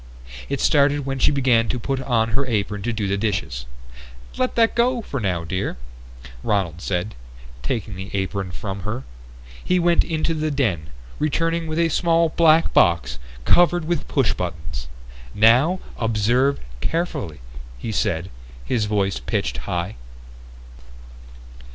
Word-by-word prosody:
It 140 - -1
started 145 -1 +3
when 135 -1 -2
she - - +4
began 125 -5 +3
to - - 0
put 135 +2 -2
on 115 -3 +1
her 135 +4 -1
apron 105 -3 -1
to 120 - -1
do 110 -3 -2
the 100 +1 0
dishes. 90 - -2 0.7
"Let 255 0 0
that 230 -1 +4
go 240 0 +2
for 140 - -4
now, 90 -6 -1
dear," 90 -1 -3 0.6
Ronald 90 -4 -1
said, 95 +3 -2 0.5
taking 100 - -3
the 95 +1 -7
apron 95 0 -2
from 95 +2 -5
her. 105 +7 -4 0.6
He 180 - +2
went 175 -1 +4
into 165 0 -1
the 155 -1 -1
den, 110 - 0 0.3
returning 165 +2 0
with 155 0 -3
a 170 -1 +3
small 165 0 +3
black 160 0 +4
box 85 -8 +3 0.3
covered 175 - +4
with 170 -1 -1
push 135 -5 +2
buttons. 80 -6 -5 0.5
"Now 125 - +5 0.2
observe 120 +5 +2 0.2
carefully," 145 - -2 0.4
he 110 - -4
said, 90 -3 -1 0.3
his 110 - 0
voice 100 -6 0
pitched - - -2
high. 90 +2 -2
115 Hz, 140 wpm, -22 LUFS, 95-155 Hz, 0.7 s, Now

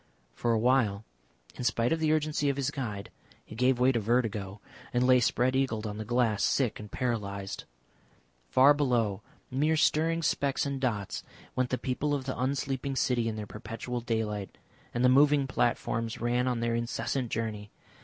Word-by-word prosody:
For 120 - 0
awhile, 110 -3 +2 0.5
in - - -6
spite 120 +2 +2
of 165 - -1
the 155 -1 +2
urgency 150 -2 +1
of 140 - -1
his 140 +1 0
guide, 110 -9 -5 0.3
he - - -11
gave 125 +2 +2
way 125 +1 +5
to 120 - 0
vertigo 105 -3 -1 0.3
and 125 +1 +2
lay 130 0 +6
spread 125 +2 +2
eagled 125 -5 0
on 105 0 -5
the - - -3
glass, 115 -2 +1
sick 125 -6 +1
and 105 -1 -9
paralysed. 100 -5 -3 0.8
Far 135 - +6
below, 120 -8 +1 0.3
mere 150 +5 +2
stirring 165 +2 +2
specks 140 -3 +1
and 140 -1 -3
dots, 105 -7 -2 0.3
went 130 -1 +1
the 130 - 0
people 145 +4 -1
of 140 - -3
the 130 - -3
unsleeping 135 +1 -2
city 125 -3 +1
in 110 - -2
their 105 -1 -5
perpetual 115 +4 -5
daylight, 105 -4 -3 0.3
and 120 +1 +1
the - - +7
moving 140 +2 +5
platforms 115 -3 -1
ran 120 +2 +1
on 120 -2 0
their 115 0 0
incessant 120 +2 -2
journey. 110 -2 -3
125 Hz, 175 wpm, -29 LUFS, 110-135 Hz, 0.8 s, the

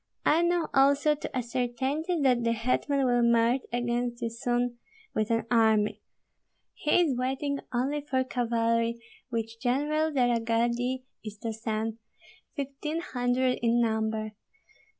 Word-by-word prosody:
I 320 +3 +4
know 345 -1 +1
also 280 +2 +4
to 290 -3 -5
a 250 - 0
certainty 260 +8 -1
that 250 -3 +3
the 230 0 +2
hetman 255 +4 0
will 245 -1 +3
march 235 +2 +3
against 240 0 -1
you 230 - -1
soon 240 +1 -1 0.3
with 215 -1 0
an 230 -1 +1
army; 220 -3 +3 0.7
he 305 +4 +2
is 300 -7 +2
waiting 270 +3 -1
only 270 +4 0
for 265 -3 0
cavalry 230 -2 0 0.3
which 230 -1 -4
General 295 +5 +1
de 260 -4 +2
la 240 -1 +2
Gardie 235 +3 0 0.2
is 215 -1 -7
to 225 -1 -2
send, 220 0 -3 0.6
fifteen 285 +2 -3
hundred 250 -3 0
in 235 0 +3
number. 220 -1 0
245 Hz, 140 wpm, -28 LUFS, 230-270 Hz, 0.7 s, I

